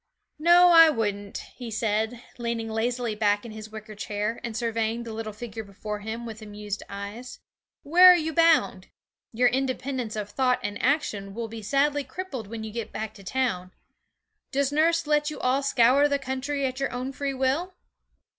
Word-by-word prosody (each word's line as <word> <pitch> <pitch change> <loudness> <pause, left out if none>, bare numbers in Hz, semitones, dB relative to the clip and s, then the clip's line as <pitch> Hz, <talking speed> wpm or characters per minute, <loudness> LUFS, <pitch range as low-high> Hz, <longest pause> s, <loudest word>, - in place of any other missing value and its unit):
'No, 345 +3 +7
I 330 -2 +9
wouldn't,' 205 -6 -2 0.2
he 245 -2 -6
said, 220 +2 -1 0.2
leaning 235 -1 -2
lazily 235 +1 -1
back 205 0 +1
in 230 - -8
his 215 0 -9
wicker 215 0 -9
chair 205 +2 -3
and 230 -2 -4
surveying 230 0 -1
the 230 -1 -7
little 220 0 -5
figure 220 +1 -7
before 210 +1 -6
him 220 +3 -5
with 225 -1 -8
amused 210 -1 -6
eyes. 200 +5 -7 0.4
'Where 355 +5 +7
are 360 - +9
you 320 -2 -1
bound? 300 - +3 0.4
Your 245 +2 +3
independence 260 -2 -2
of 205 -1 -4
thought 255 -2 +2
and 205 0 -4
action 210 -8 0
will 230 0 -3
be 225 0 -8
sadly 280 +6 +1
crippled 265 - -6
when 225 +1 -6
you 220 - -6
get 230 0 -5
back 220 0 -5
to 200 - -14
town. 185 -5 -2 0.8
Does 280 0 +1
nurse 330 +2 +2
let 295 0 +2
you 300 - -7
all 260 +2 +1
scour 275 +1 +4
the 285 -1 +1
country 270 +1 -3
at 260 0 -3
your 275 - -1
own 255 +2 -4
free 275 0 -3
will?' 280 +8 0
235 Hz, 180 wpm, -26 LUFS, 215-275 Hz, 0.8 s, I